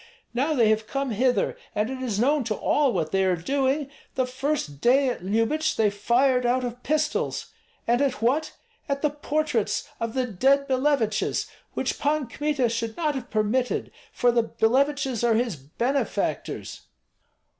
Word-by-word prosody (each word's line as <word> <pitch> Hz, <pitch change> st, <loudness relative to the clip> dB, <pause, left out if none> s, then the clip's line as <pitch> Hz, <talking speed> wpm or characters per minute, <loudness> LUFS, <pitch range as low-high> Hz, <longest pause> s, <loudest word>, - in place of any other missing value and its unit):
Now 280 Hz, +6 st, +1 dB
they 230 Hz, -5 st, +4 dB
have 215 Hz, 0 st, +1 dB
come 275 Hz, -2 st, -2 dB
hither, 245 Hz, +4 st, +1 dB, 0.2 s
and 210 Hz, +1 st, +1 dB
it 260 Hz, -1 st, -5 dB
is 225 Hz, -6 st, -2 dB
known 280 Hz, +4 st, +3 dB
to 215 Hz, -2 st, -1 dB
all 285 Hz, +4 st, +2 dB
what 165 Hz, -6 st, -1 dB
they 195 Hz, 0 st, +2 dB
are 185 Hz, -1 st, +2 dB
doing. 270 Hz, -, 0 dB, 0.3 s
The 260 Hz, -, +1 dB
first 255 Hz, -, -3 dB
day 265 Hz, +2 st, +4 dB
at 240 Hz, -, -4 dB
Lyubich 230 Hz, +11 st, +1 dB
they 215 Hz, -2 st, +2 dB
fired 250 Hz, +5 st, +2 dB
out 250 Hz, +1 st, +1 dB
of 245 Hz, 0 st, -5 dB
pistols, 305 Hz, +2 st, -1 dB, 0.3 s
and 240 Hz, +3 st, +2 dB
at 275 Hz, -2 st, 0 dB
what? 270 Hz, +7 st, +1 dB, 0.4 s
at 280 Hz, +1 st, -1 dB
the 300 Hz, -, +3 dB
portraits 295 Hz, -5 st, -1 dB
of 230 Hz, +1 st, -3 dB
the 260 Hz, -1 st, +1 dB
dead 270 Hz, +6 st, +2 dB
Billeviches, 260 Hz, -4 st, +1 dB, 0.3 s
which -, -, -2 dB
Pan 300 Hz, -1 st, +1 dB
Kmita 280 Hz, +1 st, 0 dB
should 230 Hz, -1 st, -3 dB
not 310 Hz, -3 st, 0 dB
have 255 Hz, -3 st, -6 dB
permitted, 225 Hz, +4 st, 0 dB, 0.2 s
for 245 Hz, -, +2 dB
the 235 Hz, 0 st, +3 dB
Billeviches 265 Hz, +2 st, +1 dB
are 235 Hz, -2 st, +4 dB
his 230 Hz, -4 st, 0 dB
benefactors." 235 Hz, -, -2 dB
250 Hz, 165 wpm, -25 LUFS, 225-280 Hz, 0.4 s, they